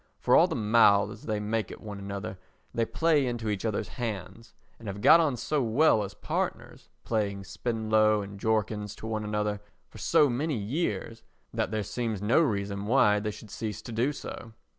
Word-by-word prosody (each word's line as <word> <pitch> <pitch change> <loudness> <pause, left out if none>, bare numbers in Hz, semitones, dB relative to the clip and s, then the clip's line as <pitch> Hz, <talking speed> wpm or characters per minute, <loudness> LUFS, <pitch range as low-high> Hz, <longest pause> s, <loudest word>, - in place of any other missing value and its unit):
For - - +3
all - - +7
the - - -3
mouths 105 -2 +3
they 105 -1 0
make 105 -1 -2
at - - -9
one 105 -2 -8
another 100 -1 -6 0.3
they 115 - +1
play 155 -5 +2
into 120 -3 -3
each 100 -2 -2
other's 110 -2 -2
hands 115 0 -5 0.2
and 115 - -10
have 100 0 -5
got 165 +11 +7
on 150 -6 +1
so 150 +4 0
well 120 0 +3
as 100 0 -7
partners, - - -4
playing 100 -3 -1
Spenlow 110 +1 +1
and 100 0 -9
Jorkins 105 -1 -1
to - - -10
one 110 -1 -2
another, 105 -1 -2 0.3
for - - -13
so 150 - +4
many 140 +3 -1
years 115 0 -3 0.3
that - - -1
there 110 0 -2
seems 115 -1 -3
no 110 - +3
reason 100 -7 -1
why 105 -4 +4
they 105 +1 -2
should 105 0 -10
cease 110 -1 -5
to - - -8
do 120 +5 +1
so. 115 -5 -8
110 Hz, 185 wpm, -28 LUFS, 105-115 Hz, 0.3 s, all